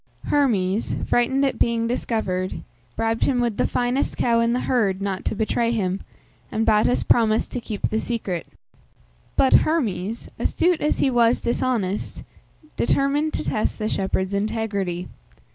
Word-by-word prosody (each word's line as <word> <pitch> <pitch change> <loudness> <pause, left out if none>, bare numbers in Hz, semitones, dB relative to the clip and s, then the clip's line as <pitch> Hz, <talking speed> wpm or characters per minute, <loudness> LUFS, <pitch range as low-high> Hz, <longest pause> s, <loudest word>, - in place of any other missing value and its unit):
Hermes, 215 -8 +1
frightened 265 +3 +2
at 270 - -1
being 230 -1 +2
discovered, 220 -6 -2 0.3
bribed 225 0 0
him 255 -3 +1
with 235 -3 0
the - - +2
finest 245 +3 0
cow 235 -1 +2
in 230 0 +2
the 245 - 0
herd 205 -7 +1
not 195 -1 -3
to - - -1
betray 225 +2 0
him, 195 -4 -1 0.5
and 220 +1 0
Battus 215 +3 +3
promised 220 -2 +3
to 245 - -3
keep 215 -3 -3
the 220 - -1
secret. 210 -8 -3 0.9
But 265 - +3
Hermes, 225 - -1
astute 350 -1 +1
as 300 - +1
he 270 - +2
was 235 -1 +3
dishonest, 230 -5 -1 0.5
determined 285 +4 +1
to - - -2
test 215 - -1
the 215 - -2
shepherd's 190 -1 -1
integrity. 200 -4 -2
225 Hz, 145 wpm, -23 LUFS, 200-245 Hz, 0.9 s, Battus